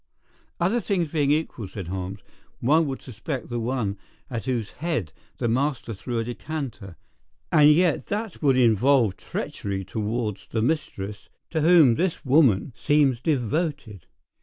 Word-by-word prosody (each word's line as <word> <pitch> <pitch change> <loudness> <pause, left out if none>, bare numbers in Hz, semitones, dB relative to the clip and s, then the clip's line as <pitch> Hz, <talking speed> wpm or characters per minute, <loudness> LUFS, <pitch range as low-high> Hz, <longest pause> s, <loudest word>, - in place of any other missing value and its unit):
"Other 190 +8 +2
things 180 -9 -1
being 145 -4 +1
equal," 145 -8 -1
said 95 -2 -7
Holmes, 95 +2 -5 0.4
"one 155 +5 +3
would 135 -1 -5
suspect 125 +1 -5
the 120 -1 -2
one 115 -4 -2 0.3
at 115 -3 -4
whose 120 -5 -2
head 150 - -3 0.2
the - - -1
master 130 0 0
threw 120 +4 -4
a 115 - 0
decanter. 120 - -6 0.6
And 150 -1 +7
yet 170 0 +2
that 210 -1 -4
would 135 -4 +3
involve 120 -2 +4
treachery 95 -1 -4
towards 105 +1 -3
the 110 -1 -1
mistress 105 -8 -3 0.2
to 160 - 0
whom 160 -6 +6
this 170 +5 -1
woman 130 -3 +4
seems 145 -5 +2
devoted. 140 - -2
130 Hz, 140 wpm, -25 LUFS, 110-155 Hz, 0.6 s, And